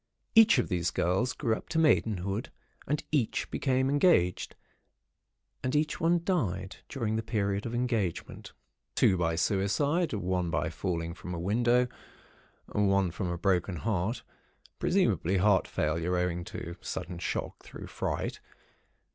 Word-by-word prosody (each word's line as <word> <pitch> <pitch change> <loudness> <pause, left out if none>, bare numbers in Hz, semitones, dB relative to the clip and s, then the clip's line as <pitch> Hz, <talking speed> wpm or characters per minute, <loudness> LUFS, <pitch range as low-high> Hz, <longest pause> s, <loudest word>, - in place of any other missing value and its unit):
Each 225 -6 +7
of 125 - +1
these 85 -3 0
girls 95 +9 +1
grew 120 -7 0
up - - -10
to 160 - -2
Maidenhood, 110 - +2 0.4
and 150 +1 -1
each 140 -8 0
became 130 -1 +1
engaged, 140 - +2 1.1
and 130 +2 -1
each 155 +1 +1
one 170 +1 +3
died 95 - -1
during 110 -5 -1
the - - 0
period 100 -2 -1
of 115 - -4
engagement, 115 -8 -2 0.4
two 95 - +4
by 85 -2 0
suicide, 105 - +1
one 90 -3 -1
by 75 -1 -1
falling 85 0 -3
from 90 0 -7
a - - -4
window, 120 +7 +2 0.8
one 100 -3 +2
from 95 +2 -3
a 85 - -2
"broken 90 0 +1
heart" 105 +4 -1 0.6
(presumably 95 +4 +2
heart 100 +1 +3
failure, 85 +4 0
owing 90 -1 -1
to 85 +1 -7
sudden 85 -1 -5
shock - - -3
through - - -10
fright). - - -3
100 Hz, 140 wpm, -29 LUFS, 90-125 Hz, 1.1 s, Each